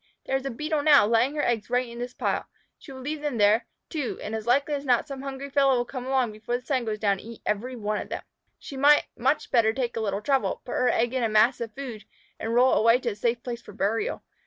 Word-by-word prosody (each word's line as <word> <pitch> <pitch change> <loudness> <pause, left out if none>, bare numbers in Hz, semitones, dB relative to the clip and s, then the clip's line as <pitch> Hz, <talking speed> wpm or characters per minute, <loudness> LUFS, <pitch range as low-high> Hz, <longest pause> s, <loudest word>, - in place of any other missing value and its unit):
"There 270 - -1
is 270 0 -1
a - - -1
Beetle 300 +5 -2
now, 285 -6 +6
laying 235 +6 +2
her 295 - 0
eggs 225 -2 0
right 250 +1 +1
in 235 0 -9
this 245 +1 -5
pile. - - -1 0.3
She 280 - -12
will 260 -1 -9
leave 295 +3 -4
them 295 -5 -2
there, 210 +2 +4 0.2
too, 295 -7 -3
and 215 - -5
as 220 0 -4
likely 280 +4 +2
as 280 -1 -2
not 250 -4 +2
some 275 -2 -6
hungry 275 0 -6
fellow 275 -1 +4
will 240 - 0
come 255 0 -6
along 260 -4 +1
before 215 +3 -3
the 250 - -15
sun 260 -4 0
goes 215 -1 -2
down 200 -2 +1
and - - -10
eat 230 +1 -11
every 240 +5 -2
one 210 -2 -2
of - - -9
them. - - -5 0.3
She 275 - -9
might 290 +2 +5
much 270 +5 0
better 225 -4 +4
take 245 -1 -2
a 225 - -2
little 200 -1 -2
trouble, 275 -2 0
put - - -7
her 250 - +2
egg 240 +1 +1
in 260 - 0
a 230 - +1
mass 220 +4 +3
of 225 -2 -5
food, 240 -7 -7 0.3
and 225 - -3
roll 255 +2 +5
it - - +3
away 230 +2 +5
to 240 - -1
a 210 - -5
safe 235 +3 -1
place 240 -1 -5
for 210 - -13
burial. 220 - -1
245 Hz, 275 wpm, -26 LUFS, 225-270 Hz, 0.3 s, now